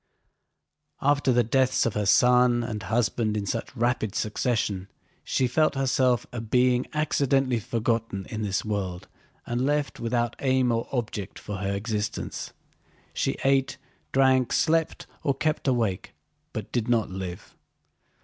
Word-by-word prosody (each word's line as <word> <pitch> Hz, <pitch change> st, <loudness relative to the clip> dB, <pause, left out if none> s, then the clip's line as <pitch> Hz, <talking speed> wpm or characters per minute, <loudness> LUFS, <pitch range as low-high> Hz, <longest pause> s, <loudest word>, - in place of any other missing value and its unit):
After 145 Hz, -1 st, +3 dB
the 120 Hz, 0 st, +4 dB
deaths 130 Hz, +3 st, +2 dB
of 115 Hz, -, 0 dB
her 105 Hz, -1 st, -1 dB
son 125 Hz, +2 st, +5 dB
and 110 Hz, -3 st, -4 dB
husband 110 Hz, -1 st, 0 dB
in 100 Hz, -, -2 dB
such 100 Hz, -, -4 dB
rapid 120 Hz, -3 st, 0 dB
succession, 105 Hz, -4 st, -1 dB, 0.4 s
she 130 Hz, -, +1 dB
felt 150 Hz, +4 st, +2 dB
herself 130 Hz, -2 st, +2 dB
a 120 Hz, -2 st, -4 dB
being 125 Hz, +2 st, +2 dB
accidentally 140 Hz, -5 st, +1 dB
forgotten 115 Hz, -3 st, -2 dB
in 110 Hz, -, -3 dB
this 100 Hz, -1 st, -1 dB
world 95 Hz, -4 st, -3 dB, 0.4 s
and 120 Hz, +1 st, -1 dB
left 145 Hz, +1 st, 0 dB
without 120 Hz, 0 st, -1 dB
aim 130 Hz, -2 st, +2 dB
or 115 Hz, 0 st, -1 dB
object 115 Hz, -6 st, -3 dB
for 105 Hz, -1 st, -6 dB
her 100 Hz, 0 st, -2 dB
existence. 105 Hz, 0 st, -3 dB, 0.6 s
She -, -, -1 dB
ate, 135 Hz, 0 st, +2 dB, 0.3 s
drank, 130 Hz, -2 st, +3 dB
slept, 160 Hz, 0 st, +1 dB, 0.2 s
or 140 Hz, -, 0 dB
kept 150 Hz, +1 st, -1 dB
awake, 115 Hz, -8 st, 0 dB, 0.4 s
but -, -, -6 dB
did 120 Hz, -1 st, -1 dB
not 115 Hz, -5 st, +1 dB
live. 90 Hz, -2 st, -7 dB
120 Hz, 140 wpm, -26 LUFS, 110-130 Hz, 0.6 s, son